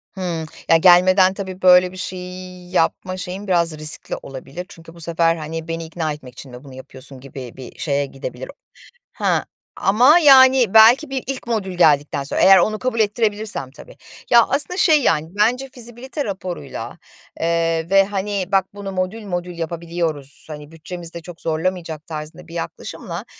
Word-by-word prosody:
Hıı. 175 -4 -3 0.2
Ya, 165 - +7
gelmeden 185 +2 +5
tabii 190 -1 -7
böyle 180 0 +6
bir 185 - -11
şeyi 180 -1 -8
yapma 185 +1 0
şeyim 185 +3 -6
biraz 170 -4 +1
riskli 155 0 -4
olabilir 135 +6 -8
çünkü 165 -3 -14
bu 170 - -11
sefer, 165 0 +2
hani, 160 0 -6
beni 165 0 -4
ikna 160 -1 -3
etmek 130 -4 -12
için 130 +1 -12
mi 125 +2 -11
bunu 135 -2 -13
yapıyorsun 130 +1 -9
gibi 130 -2 -9
bir 130 -2 -11
şeye 145 -2 0
gidebilir. 130 -2 -8 0.6
He, - - -11 0.6
ama, 250 - +5
yani, 260 - +6
belki 230 +7 +7
bir 270 -1 -3
ilk 270 -2 -4
modül 210 -5 -2
geldikten 145 -3 +3
sonra, 140 - -2
eğer 195 +1 +8
onu 215 +4 +1
kabul 255 -2 -2
ettirebilirsem 210 - -1
tabii, - - -15 0.3
ya, 235 -1 +8
aslında 295 +7 0
şey, 315 -5 +4
yani, 160 - +1
bence 240 +7 +1
fizibilite 245 +4 -6
raporuyla, 185 -3 -6 0.4
eee, 165 0 0
ve, 195 0 +6
hani, 200 -1 -2
"bak 195 -1 +3
bunu 200 -1 -7
modül 190 +4 -3
modül 175 -2 -4
yapabiliyoruz, 165 -5 -4
hani, 150 0 -9
bütçemizde 170 +1 -8
çok 170 0 -10
zorlamayacak" 165 -1 -3
tarzında 160 +2 -8
bir 165 - -13
yaklaşımla, 170 - -6
180 Hz, 160 wpm, -20 LUFS, 160-205 Hz, 0.6 s, eğer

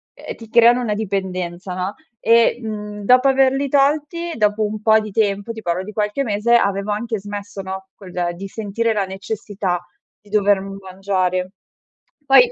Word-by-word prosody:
uhm, - - -8
ti 225 -1 -13
creano 240 +1 +6
una 215 -3 -1
dipendenza, 185 -3 -3
no, 185 +3 -2 0.3
e, 230 +1 +4
mhmm, 210 -2 -6
dopo 250 +4 +5
averli 270 +1 +3
tolti, 295 +5 +1
dopo 210 0 +2
un 210 0 -4
po' 220 0 +5
di 215 -1 -6
tempo, 205 +1 0
ti 225 -1 -8
parlo 175 0 -1
di 210 +2 -9
qualche 210 +6 -1
mese, 220 +1 +2
avevo 200 -2 +1
anche 225 0 -3
smesso, 205 0 -7
no, 190 0 -7
quel 180 -2 -3
di 195 +2 -7
sentire 220 +2 -2
la 200 -2 0
necessità 190 -2 -4 0.3
di 205 - -22
dover 205 -2 +3
mangiare. 190 -1 -2 0.7
Poi 375 - +6
210 Hz, 165 wpm, -20 LUFS, 190-230 Hz, 0.7 s, creano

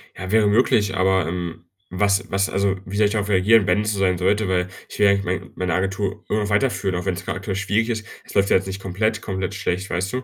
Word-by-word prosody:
Ja, 95 +1 -6
wäre 110 -1 +4
möglich, 105 -2 +2
aber, 95 -2 +2
ähm, 85 -1 -5 0.2
was 100 +1 +1
was, 95 0 +1
also 100 0 +1
wie 100 +2 -5
soll 105 - +4
ich 105 - -3
darauf 105 -2 -1
reagieren, 100 +2 +4
wenn 90 +4 +3
es 105 0 -1
so 100 - -3
sein 90 -2 +2
sollte? 100 +3 +1
Weil 90 -1 +1 0.2
ich - - -9
will 105 - +5
ja 100 - +6
eigentlich 100 0 0
mein 90 0 -3
meine 90 -2 -1
Agentur 95 +3 -2
irgendwie 105 -1 0
weiterführen, 100 -4 +1
auch 90 +2 -3
wenn's 95 0 -2
grad - - -3
aktuell 95 0 -4
schwierig 105 +4 0
ist. 110 -2 -3 0.2
Es - - -13
läuft 100 0 +2
ja - - +4
jetzt 95 +1 -4
nicht 95 0 -5
komplett 110 +4 -1
komplett 95 0 -3
schlecht, 95 -1 -2
weißt 95 +4 -2
du? 130 0 -2
95 Hz, 260 wpm, -22 LUFS, 95-105 Hz, 0.2 s, ja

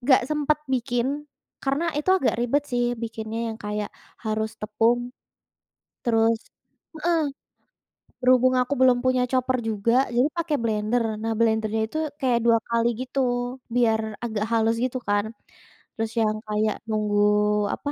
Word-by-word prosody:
nggak 260 +1 +4
sempet 300 0 +2 0.2
bikin, 245 -1 0 0.5
karena 275 +5 0
itu 300 - -4
agak 330 - +1
ribet 280 +5 +1
sih 245 0 +2 0.2
bikinnya, 225 -1 -4
yang 220 - -10
kayak 210 0 -3 0.3
harus 220 0 -1
tepung, 235 +3 +1 0.9
terus 225 -1 +3 0.6
heeh. 335 0 +2 1.0
Berhubung 255 0 +4
aku 250 +3 +1
belum 255 -1 +6
punya 255 -1 +2
chopper 255 0 +1
juga, 225 0 0 0.2
jadi 245 - +4
pakai 335 -3 -1
blender. 220 +2 +1 0.2
Nah 225 0 -1
blendernya 220 -1 +1
itu, 310 - -5 0.2
kayak 250 -3 +2
2 230 -1 +6
kali 235 0 +2
gitu, 260 +2 -3 0.6
biar 225 -2 +3 0.2
agak 220 -3 -2
halus 225 0 +2
gitu 255 0 -1
kan. 205 0 +2 0.7
Terus 225 0 -2
yang 215 0 +1
kayak 215 0 0
nunggu 210 -1 +2 0.5
apa, 285 - -4
235 Hz, 135 wpm, -25 LUFS, 220-255 Hz, 1.0 s, belum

